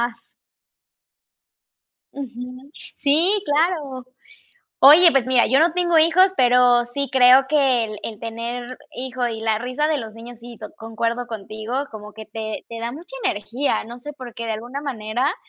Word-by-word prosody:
Más. - - -35 1.9
Ujú. 255 0 -9 0.3
Sí, 310 +7 +3
claro. 290 -4 -1 0.8
Oye, 325 +5 +8
pues 270 -4 +1
mira, 255 -2 +3
yo 265 - +3
no 325 +2 +3
tengo 345 -2 +2
hijos, 335 +4 +5
pero 245 -2 +4
sí 275 +3 -4
creo 260 0 +6
que 270 -5 +3
el 215 -1 -7
el 215 -2 -7
tener 235 +2 -6
hijo 255 -1 -3
y 225 -2 -4
la 220 -1 0
risa 255 +6 -2
de 305 -2 0
los 220 -2 -8
niños, 230 +1 -11
sí 240 0 -11
to 215 - -9
concuerdo 230 +2 -3
contigo, 225 +5 -5
como 210 -1 -10
que 220 -1 -11
te 220 0 -6
te 230 - -8
da 235 +1 -4
mucha 350 - -10
energía, 235 - -1
no 240 +2 -10
sé, 295 +4 -8
por 255 -5 -11
qué, 230 - -6
de 225 - -2
alguna 240 +6 -6
manera, 255 - -2
245 Hz, 165 wpm, -21 LUFS, 230-280 Hz, 1.9 s, Oye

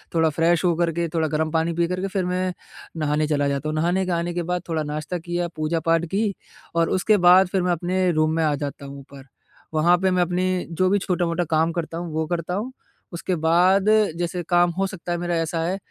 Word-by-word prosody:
थोड़ा 160 -1 +3
फ्रेश 165 +2 +1
हो 175 - +3
कर 170 0 +1
के 170 0 -1
थोड़ा 160 -2 +1
गर्म 155 +1 -1
पानी 165 +1 0
पी 170 0 +1
कर 180 +1 -3
के 195 - -1
फिर 190 -1 -2
मैं 180 0 -1 0.4
नहाने 150 0 0
चला 145 -2 +1
जाता 140 +2 -2
हूँ। 155 - -3
नहाने 175 +4 +1
के 185 - -2
आने 170 0 -1
के 175 0 -2
बाद 180 +1 -2
थोड़ा 160 -2 -1
नाश्ता 150 +4 -4
किया, 175 +1 -2
पूजा-पाठ 165 +1 0
की 205 0 +1 0.4
और 165 0 +2
उसके 205 +3 +2
बाद 185 +1 +7
फिर 190 +1 0
मैं 180 0 +1
अपने 180 +2 0
रूम 155 -1 +1
में 165 - +1
आ 150 -1 +2
जाता 140 0 -6
हूँ 140 0 -9
ऊपर 135 0 -13 0.5
वहाँ 170 +3 +4
पे 190 +1 +1
मैं 180 -1 +2
अपनी 180 +1 0
जो 185 +3 +1
भी 200 - +3
छोटा-मोटा 175 -2 -1
काम 160 +1 +2
करता 165 -1 -4
हूँ 170 -1 -5
वो 160 0 -1
करता 170 +1 -3
हूँ। 225 +6 -3 0.4
उसके 175 +2 -2
बाद 175 +4 +3 0.3
जैसे 175 +1 -2
काम 175 -1 +4
हो 195 - +1
सकता 180 -2 -7
है 175 - 0
मेरा 175 0 -2
ऐसा 165 0 -2
है 180 +4 -1
170 Hz, 235 wpm, -23 LUFS, 160-180 Hz, 0.5 s, बाद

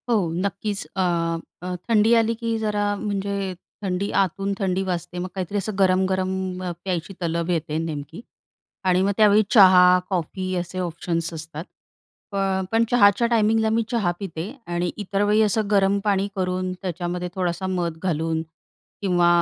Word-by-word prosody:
हो, 235 - +4 0.3
नक्कीच. 200 +1 -2
अ, 190 - 0 0.6
अ, 180 0 -4
थंडी 225 0 +4
आली 225 +1 0
की 230 0 -2
जरा 205 -1 0
म्हणजे 200 -2 -2 0.3
थंडी 190 +1 -1
आतून 195 +1 -1
थंडी 190 -1 0
वाजते. 180 -1 -4
मग 180 - -3
काहीतरी 190 +2 -3
असं 205 +2 -2
गरम-गरम 185 0 +2 0.5
प्यायची 185 0 -3
तलब 170 0 -1
येते 160 -3 -1
नेमकी 160 +2 -5 0.6
आणि 185 0 +3
मग 195 +1 +2
त्यावेळी 215 0 +6
चहा, 180 -4 +7
कॉफी 185 +1 -2
असे 180 +1 -3
ऑप्शन्स 170 -1 -2
असतात. 160 0 -6 0.7
प - - -7 0.4
पण 225 +1 +3
चहाच्या 220 -1 +5
टायमिंगला 220 -1 +2
मी 225 +1 +2
चहा 215 -7 +1
पिते 180 -1 -5 0.2
आणि 175 0 -1
इतर 200 -1 -2
वेळी 210 +1 +3
असं 215 0 +2
गरम 200 -1 +3
पाणी 200 -2 +1
करून 185 -1 -1
त्याच्यामध्ये 180 -1 -3
थोडासा 180 0 -1
मध 175 -3 -2
घालून 160 -2 0 0.6
किंवा 175 -3 +3
190 Hz, 150 wpm, -23 LUFS, 175-205 Hz, 0.7 s, चहा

